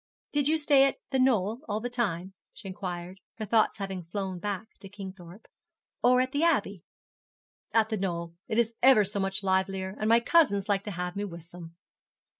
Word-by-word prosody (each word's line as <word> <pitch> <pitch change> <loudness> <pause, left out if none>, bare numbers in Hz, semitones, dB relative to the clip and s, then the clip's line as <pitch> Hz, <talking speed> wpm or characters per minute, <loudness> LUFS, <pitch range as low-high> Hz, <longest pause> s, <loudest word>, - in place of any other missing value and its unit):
'Did 290 -1 +1
you 315 +1 +3
stay 290 -3 +5
at - - -2 0.2
The 265 - +1
Knoll 230 -2 +2
all 210 +1 0
the 240 - -3
time,' 195 -7 -2 0.2
she 205 - -10
inquired, 185 -1 -6 0.2
her 220 - -5
thoughts 220 +1 +2
having 195 -3 -5
flown 185 +1 -4
back 205 +2 -4
to 195 - -11
Kingthorpe; 190 -1 -10 0.6
'or 250 +1 +5
at 255 0 -1
the 285 - -1
Abbey?' 205 - +1 0.9
'At 220 -1 +3
The 220 - -1
Knoll. 170 -3 -3
It 225 -3 -2
is 235 -1 +2
ever 255 -4 +7
so 200 +1 -2
much 195 0 -1
livelier, 190 0 0
and 215 - 0
my 230 +1 +6
cousins 235 - +3
like 200 -2 +1
to 210 - -4
have 180 0 -3
me 200 - -2
with 170 -3 -10
them.' 170 -1 -11
200 Hz, 195 wpm, -28 LUFS, 190-235 Hz, 0.9 s, ever